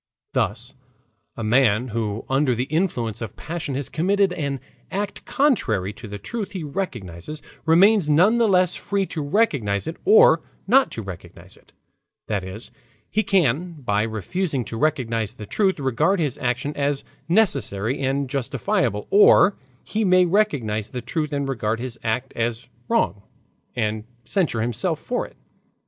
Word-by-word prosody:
Thus 120 +6 -1 0.6
a 115 - -4
man 115 +1 +3
who 110 -1 -3
under 135 -1 +2
the 120 - 0
influence 130 - -1
of 110 -4 -6
passion 150 -3 -4
has 140 -2 -2
committed 195 +3 +1
an 140 -5 -3 0.3
act 205 +1 -4
contrary 110 - +1
to 105 +3 -10
the 105 0 -6
truth 205 - -5
he 185 -4 -4
recognizes, 140 - -5 0.3
remains 185 +1 +5
none 185 +10 +4
the 230 - +4
less 185 -3 +3
free 200 -1 -1
to 165 - -4
recognize 145 - +1
it 160 +2 -5
or 445 +4 +6 0.2
not 260 +6 +4
to 115 - -5
recognize 95 -3 -10
it; - - -24 0.6
that 100 -3 -1
is, 95 +5 -8 0.4
he 215 - +2
can 175 - +1
by 110 -9 -1
refusing 120 - -2
to 115 - -6
recognize 115 -6 0
the 110 -4 -9
truth 190 - +1
regard 150 +9 +1
his 150 -6 0
action 125 +4 -1
as 140 -1 -1 0.3
necessary 140 - +1
and 135 +1 0
justifiable, 120 -5 -1
or 205 0 +6 0.3
he 220 +1 -1
may 185 -2 +5
recognize 145 - 0
the 125 -2 -6
truth 150 +4 -2
and 140 -1 -1
regard 115 -4 -1
his 120 -1 -4
act 120 +4 -2
as 115 +1 -2 0.2
wrong 230 - +1 0.5
and 110 -2 -1 0.2
censure 150 - 0
himself 120 - -1
for 245 - -2
it. - - -22
140 Hz, 155 wpm, -23 LUFS, 115-185 Hz, 0.6 s, or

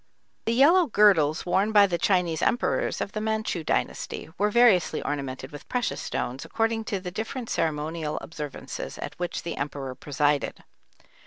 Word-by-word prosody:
] - - -45
The 230 - +2
yellow 325 +7 +6
girdles 190 - +4
worn 190 +4 +2
by 205 -2 +7
the 175 -3 -1
Chinese 175 -4 +1
emperors 240 - +1
of 200 - -3
the 215 - -3
Manchu 220 -5 -1
dynasty - - -2
were 210 +2 +1
variously 220 -6 +4
ornamented 135 -2 -4
with 145 0 -11
precious 250 -1 -1
stones 130 +3 -3
according 225 0 -1
to 205 -4 -2
the 180 -1 -6
different 225 +5 -5
ceremonial 155 0 -1
observances 150 -4 -7
at - - -6
which 175 -1 -3
the 170 - -4
emperor 140 -2 -4
presided. 145 +2 -1
180 Hz, 160 wpm, -26 LUFS, 150-220 Hz, -, by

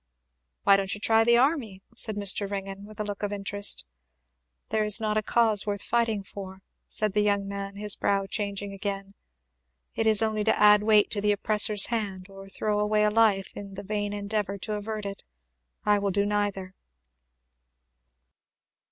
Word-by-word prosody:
"Why 200 -1 +6
don't 195 +1 -2
you - - -9
try 225 +1 +3
the 235 +1 +4
army?" 245 -8 0
said 220 -2 0
Mr. 200 0 +3
Ringgan 195 0 -6
with 215 0 -14
a - - 0
look 205 -1 -6
of 205 -1 -2
interest. 200 - -2 0.8
"There 215 0 +1
is 210 +1 +2
not 215 -1 -1
a 215 - +2
cause 215 -2 +2
worth 200 -1 -1
fighting 230 -3 0
for," 190 0 -10 0.2
said 215 -2 -1
the 210 - +2
young 200 -1 +1
man, 200 0 -5
his 210 0 +1
brow 195 -1 0
changing 200 -1 -4
again. 195 0 -5 0.8
"It 225 - -1
is 220 0 +4
only 215 -1 0
to 220 - +2
add 210 0 +7
weight 210 -1 +4
to 205 - -2
the 210 0 +2
oppressor's 210 0 +3
hand, 195 -4 -4
or 195 0 -12
throw 210 +1 -1
away 210 0 +2
life 210 -3 +2
in 200 -1 -9
the 200 - -7
vain 205 0 -3
endeavour 205 -1 -3
to 210 +3 -5
avert 210 0 -5
it. 200 0 -6 0.6
I 210 0 +3
will 200 0 -1
do 200 +1 0
neither." 205 -2 -2
205 Hz, 175 wpm, -26 LUFS, 200-215 Hz, 0.8 s, add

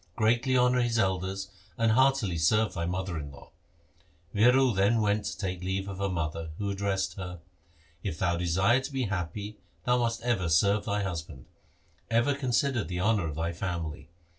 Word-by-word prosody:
Greatly 120 +4 +2
honour 125 0 +4
his 120 -1 +1
elders, 95 0 -1 0.3
and 115 -1 +3
heartily 130 -6 +3
serve 100 +5 +2
thy 85 -2 -2
mother 90 -1 -3
in 70 -1 -7
law.' - - -15 0.8
Viro 125 +4 +5
then 105 +3 +2
went 105 0 +1
to - - -4
take 90 -3 -3
leave 95 +1 -2
of 95 -1 -6
her 100 0 0
mother, 80 -2 -3
who 100 -1 -2
addressed 100 0 -1
her, 90 -2 -6 0.3
' 85 0 -33
If 95 -6 -3
thou 85 0 +1
desire 95 +8 +2
to 135 - -6
be 135 -1 -1
happy, 100 +1 -4 0.2
thou 125 0 +2
must 115 0 -1
ever 110 -8 0
serve 100 +6 +3
thy 105 0 0
husband. 80 -8 -5 0.6
Ever 120 +5 +3
consider 130 -2 0
the 90 -1 -4
honour 100 -2 +2
of 75 - -5
thy 85 +2 -2
family. 85 -4 -4
100 Hz, 180 wpm, -29 LUFS, 85-115 Hz, 0.8 s, Viro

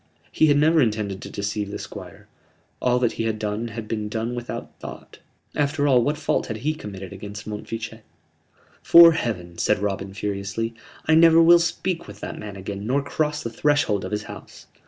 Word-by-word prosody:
He 155 - +4
had 145 -1 +4
never 160 +2 +4
intended 105 -5 -1
to - - -7
deceive 105 0 -3
the 100 - -5
Squire: - - -10 0.5
all 125 0 +3
that 125 -2 +2
he 115 - -3
had 110 -1 -1
done 105 +2 -3
had 115 -1 -7
been 105 -1 -3
done 115 +2 -2
without 120 0 -6
thought. - - -10 0.4
After 145 0 +1
all, 130 -3 +5
what 145 +4 0
fault 150 - 0
had 110 - -4
he 155 - +2
committed 100 - -8
against 100 +1 -8
Montfichet? 110 +1 -6 0.8
"'Fore 170 0 +9
Heaven," 90 - -3
said 105 - +2
Robin, 100 -1 -3
furiously, 105 +3 -3 0.3
"I 160 - +3
never 165 0 +7
will 170 +1 +7
speak 170 +1 -2
with 105 0 -11
that - - -6
man 105 -2 -7
again 100 +2 -6
nor 135 +3 +1
cross 150 +1 -1
the 115 - -4
threshold 120 -6 +1
of - - -4
his 105 - -2
house!" - - -11
115 Hz, 190 wpm, -23 LUFS, 105-145 Hz, 0.8 s, Fore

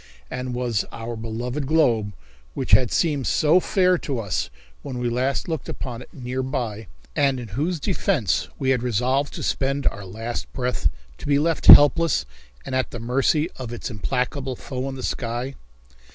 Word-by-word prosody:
And 125 -1 -4
was 120 -4 0
our 115 +1 -5
beloved 120 +5 -4
globe, 120 -10 +2 0.4
which - - -3
had 115 +3 +6
seemed 145 -7 +1
so 155 +4 +4
fair 185 -1 +2
to 135 -3 -3
us 100 - -2 0.3
when 130 - -6
we 120 -1 -1
last 130 +3 0
looked 160 -3 -4
upon 125 -2 -5
it - - -13
near 130 -4 -4
by, 120 -6 -3 0.3
and 135 -2 +2
in 120 -3 -7
whose 155 - -1
defence 155 - 0
we 135 -1 +1
had 125 -2 +2
resolved 125 +4 0
to - - -5
spend 135 +1 0
our 100 - -1
last 110 +5 -5
breath, 125 -1 0 0.3
to - - -7
be 140 -1 +4
left 160 +2 0
helpless 145 - +8 0.4
and - - -5
at 130 0 0
the 120 - -7
mercy 135 +6 +1
of 125 -3 -6
its 120 +1 -5
implacable 125 +4 -2
foe 130 +2 -5
in 135 - -6
the 130 - -7
sky? 120 +2 -3
130 Hz, 175 wpm, -23 LUFS, 120-140 Hz, 0.4 s, helpless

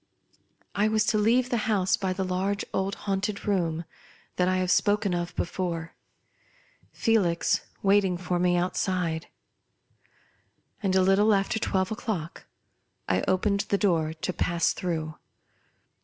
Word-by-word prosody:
I 205 +1 +2
was 215 0 +2
to 215 - +2
leave 240 +4 +2
the 240 - +2
house 190 -3 +2
by 190 -1 -2
the 190 +1 -2
large, 190 +2 -1
old, 195 +1 -1
haunted 200 +1 -2
room 170 -5 0 0.5
that 180 - +2
I 185 0 +2
have 185 -1 0
spoken 205 -1 +2
of 175 0 -3
before; 170 -2 -3 1.0
Felix 195 -8 +1 0.2
waiting 195 -2 +3
for 180 0 -2
me 175 0 +2
outside. 175 -2 -1 1.5
And, 190 -3 +1
a 190 - +5
little 205 +3 +4
after 195 +3 0
twelve 190 -2 0
o'clock, 200 -7 -4 0.6
I 90 - +1
opened 200 +2 +1
the 200 - +2
door 165 -6 +1
to 165 +3 -4
pass 170 -1 +1
through. 160 -3 -3
185 Hz, 135 wpm, -27 LUFS, 175-205 Hz, 1.5 s, a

